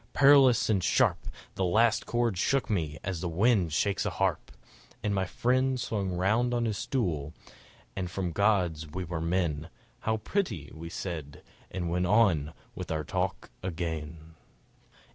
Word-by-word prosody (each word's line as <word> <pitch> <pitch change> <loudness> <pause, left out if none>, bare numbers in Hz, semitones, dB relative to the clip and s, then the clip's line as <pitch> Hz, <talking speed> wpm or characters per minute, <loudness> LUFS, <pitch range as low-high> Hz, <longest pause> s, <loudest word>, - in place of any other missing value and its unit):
Perilous 135 -3 +6
and 100 -5 +1
sharp - - +2 0.3
The 95 - -2
last 110 +5 +3
chord 120 -3 +1
shook 135 +8 +1
me 80 -6 -1
as 95 -2 -3
wind 90 +1 +2
shakes 100 +6 +1
a - - 0
harp!... - - -1 0.5
And 105 - 0
my 95 -1 +1
friend 130 +6 +1
swung 100 -5 -2
round 110 +7 +1
on 120 -1 +1
his 110 -3 -2
stool, 80 - -2 0.6
and 90 -2 -3
from 90 0 -3
gods 90 -5 +1
we 90 +5 -5
were 85 -2 -4
men, 85 -2 -1 0.3
"How 110 0 0
pretty!" 110 - -2
we 80 +1 -8
said; 80 -6 -6 0.3
and 90 -2 -3
went 90 +1 +1
on 90 -8 +3 0.2
with - - -7
our 80 -1 -1
talk - - -3
again. 80 -2 -5
95 Hz, 150 wpm, -29 LUFS, 80-110 Hz, 0.6 s, Perilous